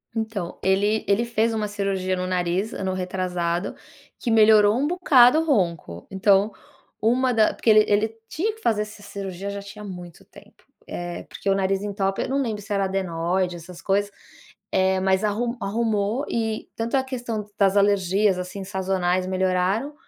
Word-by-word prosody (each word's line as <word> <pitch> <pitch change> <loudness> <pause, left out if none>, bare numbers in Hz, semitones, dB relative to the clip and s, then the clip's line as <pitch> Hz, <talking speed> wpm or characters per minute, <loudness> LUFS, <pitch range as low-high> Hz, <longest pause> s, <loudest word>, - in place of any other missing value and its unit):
Então, 220 -6 -3
ele 205 +3 +2
ele 200 +4 +2
fez 230 -1 0
uma 215 -1 -1
cirurgia 195 -2 -1
no 185 0 -3
nariz 185 +3 -1
ano 190 -1 -2
retrasado, 180 -1 -2 0.4
que 235 - -2
melhorou 215 -1 +6
um 280 +3 +1
bocado 305 -6 +5
o 325 - -1
ronco. 170 - -1
Então, 195 +2 +3 0.5
uma 250 +3 +2
da 220 -2 +3
porque - - -1
ele 215 -1 +7
ele 220 +2 +1
tinha 420 +7 -2
que 445 - -17
fazer 215 - +1
essa 210 0 -12
cirurgia 195 -1 -6
já 200 0 -5
tinha 205 +1 -10
muito 180 -4 -9
tempo, - - -18 0.2
eh, 175 0 -5
porque 200 - -4
o 195 - +3
nariz 195 0 0
entope. 195 -1 -1
Eu - - -5
não 275 +1 +1
lembro 220 -5 -3
se 205 0 -5
era 195 -1 +1
adenoide, 180 -1 -1
essas 170 0 -11
coisas, 200 +2 0 0.6
eh, 190 0 +2
mas 190 +1 +2
arru 235 +4 -1
arrumou 220 +4 0
e 220 -1 -2
tanto 230 +4 -2
a 265 - +1
questão 240 -5 -4
das 200 0 +3
alergias, 200 -1 +3
assim, 185 +2 -6
sazonais 185 -1 -1
melhoraram, 190 +8 0
200 Hz, 170 wpm, -24 LUFS, 185-220 Hz, 0.6 s, ele